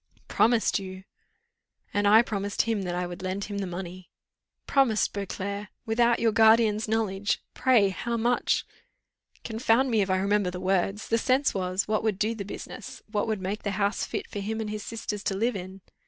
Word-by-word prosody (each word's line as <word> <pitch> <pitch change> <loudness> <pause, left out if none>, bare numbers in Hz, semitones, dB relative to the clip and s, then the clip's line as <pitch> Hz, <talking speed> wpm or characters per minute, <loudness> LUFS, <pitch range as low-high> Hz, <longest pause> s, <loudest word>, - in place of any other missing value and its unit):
"Promised 230 -2 +3
you!" 185 -1 -8 0.9
"And 205 0 +2
I 220 +3 +7
promised 200 -3 -1
him 225 -3 -1
that 175 -1 -2
I 180 0 -1
would 175 0 -7
lend 185 +2 -3
him 205 -1 -4
the 195 - -2
money." 180 0 -7 0.6
"Promised! 260 -6 +2
Beauclerc? 200 +1 -4 0.2
Without 235 +1 +3
your 230 -1 +2
guardian's 220 -1 +4
knowledge? 210 -2 0
Pray, 235 -7 +4
how 235 +5 -3
much 240 +2 +1 0.4
" - - -37
"Confound 230 +3 +2
me, 220 -2 +3
if 195 - -1
I 185 - +2
remember 200 0 +1
the 180 0 -6
words. 195 +2 0
The 230 - +2
sense 265 +4 +2
was, 185 0 -1
what 215 0 +1
would 215 -4 0
do 215 +3 0
the 215 -3 -5
business; 255 +5 -8
what 210 0 0
would 215 -3 -1
make 200 +3 -3
the 200 -2 -3
house 200 0 0
fit - - -4
for 205 - -6
him 220 +3 -3
and 215 -1 -3
his 215 0 -4
sisters 210 -2 -5
to 195 - 0
live 230 +4 0
in." 190 +1 -7
210 Hz, 195 wpm, -27 LUFS, 195-225 Hz, 0.9 s, I